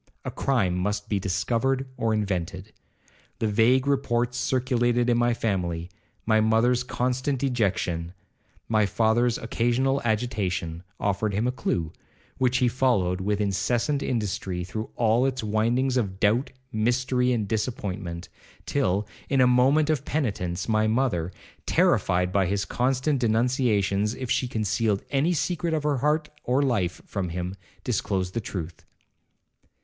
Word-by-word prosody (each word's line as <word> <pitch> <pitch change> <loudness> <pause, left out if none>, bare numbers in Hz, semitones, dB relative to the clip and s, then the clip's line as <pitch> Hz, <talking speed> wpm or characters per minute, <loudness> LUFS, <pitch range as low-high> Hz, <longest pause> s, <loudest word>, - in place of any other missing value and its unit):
A - - -3
crime 115 -10 +1
must 105 +3 -2
be 100 - +1
discovered 120 +8 0
or 115 -3 0
invented. 95 -1 -2 0.6
The - - -1
vague 115 +5 +3
reports 125 -3 0
circulated 120 -2 +1
in 120 - +2
the 120 0 +2
family, 90 -6 -2 0.3
my 110 -1 +4
mother's 115 +3 +3
constant 130 +2 -1
dejection, 95 -10 -1 0.5
my 110 -2 +2
father's 115 +4 +2
occasional 120 +4 0
agitation, 100 -7 -1 0.2
offered 100 0 0
him 110 +4 +1
a 125 - +2
clue, 85 -10 -2 0.5
which 125 0 +2
he 125 - +3
followed 110 -8 +1
with 105 +1 0
incessant 120 +8 0
industry 100 -7 -2
through 110 +5 -5
all 120 +3 +3
its 130 -3 -3
windings 120 +5 +1
of 95 -5 -2
doubt, 115 +7 +2 0.2
mystery, 125 +3 +1
and 110 -4 0
disappointment, 95 -6 -3 0.4
till, 105 -7 0 0.2
in 135 - +2
a 130 - +6
moment 135 +5 +4
of 145 -3 -1
penitence, 95 - -2
my 110 -1 +2
mother, 110 -8 0 0.4
terrified 90 0 +2
by 95 -1 +2
his 100 +1 -1
constant 130 +5 0
denunciations 110 -3 +1
if 130 -2 -5
she 130 - +1
concealed 110 -2 0
any 145 +5 +2
secret 170 -1 0
of 155 - -2
her 150 -2 +1
heart 150 +3 +1 0.2
or 130 +3 +2
life 100 -10 0
from 95 -3 -3
him, 90 +2 -4 0.3
disclosed 95 -2 -1
the 115 - -1
truth. 85 -5 -6
115 Hz, 140 wpm, -26 LUFS, 100-125 Hz, 0.6 s, a